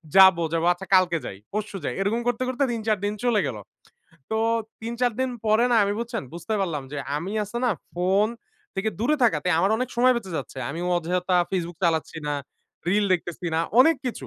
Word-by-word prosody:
যাব, 190 -2 +9 0.2
যাব, 165 0 +1
আচ্ছা 190 +2 -10
কালকে 180 -2 +4
যাই, 95 - -6
পরশু 210 -1 -3
যাই - - -1
এরকম 220 +4 0
করতে, 245 +1 0
করতে 260 +2 0
৩-৪ 220 -2 0
দিন 205 - 0
চলে 235 -4 +3
গেল। 115 - -4 0.7
তো, 220 - 0 0.5
৩-৪ 235 +2 0
দিন 260 - +1 0.2
পরে 215 +3 +4
না, 235 - +4
আমি 200 - 0
বুঝছেন, 235 -2 -3
বুঝতে 195 +6 -3
পারলাম 165 -7 -1
যে - - -4 0.2
আমি 170 +6 -4
আছে 210 +4 -7
না 245 - +3 0.2
ফোন 190 +4 +2 0.5
থেকে 195 +3 -1
দূরে 295 +7 +2
থাকাতে, 220 -6 +2
আমার 190 +5 +3
অনেক 255 +2 -2
সময় 255 +2 +5
বেঁচে 195 -5 -5
যাচ্ছে। 135 - -6
আমি 165 - -5 0.2
অযথা 180 +2 0
Facebook 175 -3 -3
চালাচ্ছি 160 -1 0
না, 145 - 0 0.5
রিল 205 +3 +3
দেখতেছি 175 0 -2
না। 160 - +2 0.2
অনেক 320 +4 +6
কিছু। 245 - -4
200 Hz, 195 wpm, -25 LUFS, 175-235 Hz, 0.7 s, যাব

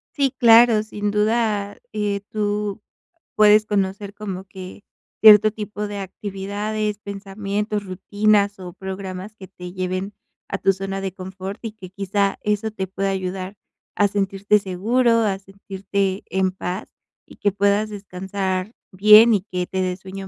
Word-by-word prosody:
Sí, 275 -3 +1
claro, 230 -2 +6
sin 210 -1 -3
duda, 210 -1 0 0.2
eh, 205 -1 -1
tú 210 -1 -2 0.5
puedes 210 0 +6
conocer 200 -1 -2
como 195 -3 -6
que 190 +1 -11 0.4
cierto 215 0 +8
tipo 210 -1 -5
de 205 0 -5
actividades, 205 +2 -4
pensamientos, 205 +1 -4
rutinas, 205 +2 +1
o 180 -2 -8
programas 190 +2 -7
que 190 -3 -11
te 180 -2 -10
lleven 185 +2 -3 0.4
a - - -2
tu 195 - +2
zona 195 +1 -4
de 195 -2 -4
confort 190 +2 -7
y 225 - -4
que 195 -4 -12
quizá 200 +1 0
eso 210 +1 -1
te 190 -3 -4
pueda 195 +1 -2
ayudar 190 +1 -4 0.4
a 205 -1 +3
sentirte 200 +1 +1
seguro, 230 +5 +1
a 200 -3 0
sentirte 195 0 -3
en 190 +1 +1
paz, 185 0 -5 0.4
y - - -16
que 205 - 0
puedas 200 +1 +2
descansar 190 0 -4 0.2
bien 210 +4 +7
y 200 -3 +1
que 180 -1 -2
te 190 - -4
dé 185 -1 -1
sueño 190 +1 -9
200 Hz, 150 wpm, -22 LUFS, 190-210 Hz, 0.5 s, cierto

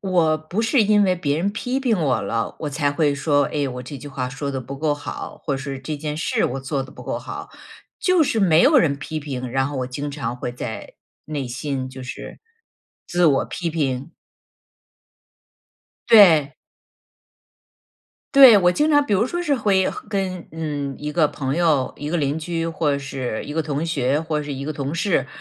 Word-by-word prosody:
我 170 -5 +2
不 175 +9 -3
是 235 +2 +3
因 210 0 +4
为 185 -2 +2
别 145 -4 -1
人 190 +5 0
批 250 +4 -2
评 235 -7 +1
我 135 -5 +1
了， 115 -2 -2
我 150 -2 -3
才 145 0 0
会 145 -1 +2
说- 145 0 +2
哎， 145 -2 0
我 125 0 -6
这 135 +2 -8
句 145 - -10
话 130 -3 -4
说 135 +2 -5
得 135 -1 -3
不 135 +2 -8
够 155 -1 +1
好， 145 - -7
或 140 - -1
是 135 0 -5
这 150 +2 -4
件 150 0 -4
事 160 - 0
我 135 +2 -2
做 135 0 -2
得 130 - -13
不 - - -11
够 - - -3
好。 - - -8 0.5
就 365 -3 +3
是 255 -6 0
没 170 -6 +5
有 275 +1 +6
人 155 - +2
批 155 +2 -5
评， 130 -4 -5
然 135 +1 +1
后 145 0 -5
我 125 - -2
经 140 +3 -4
常 125 -4 -4
会 125 -1 -4
在 110 -2 -7 0.3
内 145 -5 -4
心， 130 +1 -3
就 130 0 -10
是， 130 +2 -8 0.7
自 175 0 +3
我 140 -3 +3
批 175 -2 -4
评。 140 -1 -2 2.0
对。 165 -10 +7 1.8
对， 260 -7 +10
我 180 -1 +4
经 300 - +1
常 290 -1 +5
比 205 - +1
如 215 +5 +2
说 345 +6 -3
是 290 -5 +1
会 195 -4 +2
和 - - -7
跟 190 -4 -3
嗯， 145 -4 -3
一 150 0 -4
个 155 0 +3
朋 135 0 -3
友、 155 -7 +2
一 150 +1 -5
个 175 - 0
邻 145 +1 0
居， 165 +1 -2
或 150 -3 0
是 130 -5 -4
一 145 - -7
个 160 - +1
同 150 +1 -2
学， 140 -2 +1
或 155 -2 -2
是 145 -1 -5
一 140 +1 -5
个 155 - -2
同 140 0 -4
事， 165 -5 +1
150 Hz, 215 characters per minute, -22 LUFS, 135-175 Hz, 2.0 s, 对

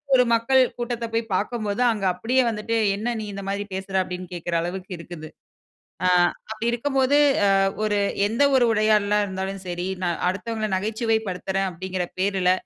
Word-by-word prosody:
ஒரு 250 - +6
மக்கள் 260 +3 +4 0.2
கூட்டத்த 240 -1 -3
போய் 230 0 +1
பாக்கம்போது, 215 +1 -2
அங்க 210 -3 -3
அப்படியே 235 +8 +1
வந்துட்டு 225 +1 -2 0.2
என்ன 235 +4 -2
நீ - - -4
இந்த 200 - -6
மாதிரி 200 +1 -2
பேசுற? 190 0 -5
அப்படின்னு 180 0 -6
கேட்கிற 175 0 -4
அளவுக்கு 185 +3 -5
இருக்குது. 165 -2 -9 0.8
அ - - +4 0.4
அப்படி 220 +1 -3
இருக்கும் 270 +3 -2
போது 270 +3 +4 0.3
அ - - +4 0.3
ஒரு, 210 -1 +1 0.3
எந்த 230 +7 +1
ஒரு 250 - +5
உரையாடலா 210 -1 +3
இருந்தாலும் 190 0 -4
சரி, 175 +1 -3 0.2
நான் 175 -2 -1
அடுத்தவங்கள 215 +3 -3
நகைச்சுவை 220 +3 0
படுத்துறேன் 190 +1 -2
அப்படிங்கிற 185 +1 -4
பேர்ல 190 -2 +2
205 Hz, 160 wpm, -24 LUFS, 185-230 Hz, 0.8 s, ஒரு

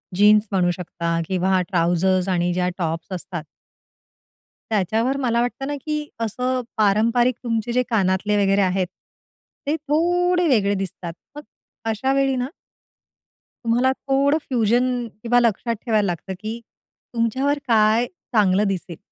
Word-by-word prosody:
Jeans 210 +2 +5
म्हणू 180 -2 +2
शकता 170 -1 -3
किंवा 185 0 +1
ट्राउझर्स 180 +1 +1
आणि 175 -1 +1
ज्या 180 0 0
टॉप्स 165 -1 -3
असतात. 175 -2 -6 1.3
त्याच्यावर 220 +6 +1
मला 235 -3 +1
वाटतं 245 +3 -2
ना, 290 - -2
की 300 -1 -2
असं 250 +3 -1 0.2
पारंपरिक 230 +4 +3
तुमचे 230 0 -1
जे 250 +1 +2
कानातले 205 -1 +1
वगैरे 195 +1 +3
आहेत. 185 -1 +1 0.8
ते 300 - +2
थोडे 350 +4 +1
वेगळे 210 -8 +3
दिसतात. 185 -3 -5 0.2
मग 295 - -7 0.5
अशा 245 +5 0
वेळी 275 -1 +2
ना. 250 0 -1 1.2
तुम्हाला 245 +3 +3
थोडं 275 +3 +1
फ्युजन 245 +1 +1 0.2
किंवा 245 +1 +3
लक्षात 235 0 +1
ठेवायला 215 -4 +2
लागतं, 180 +1 -3
की 220 +3 -5 0.5
तुमच्यावर 260 +5 +1
काय 220 +1 +4 0.3
चांगलं 200 -2 +4
दिसेल. 180 -3 -4
220 Hz, 130 wpm, -22 LUFS, 190-255 Hz, 1.3 s, Jeans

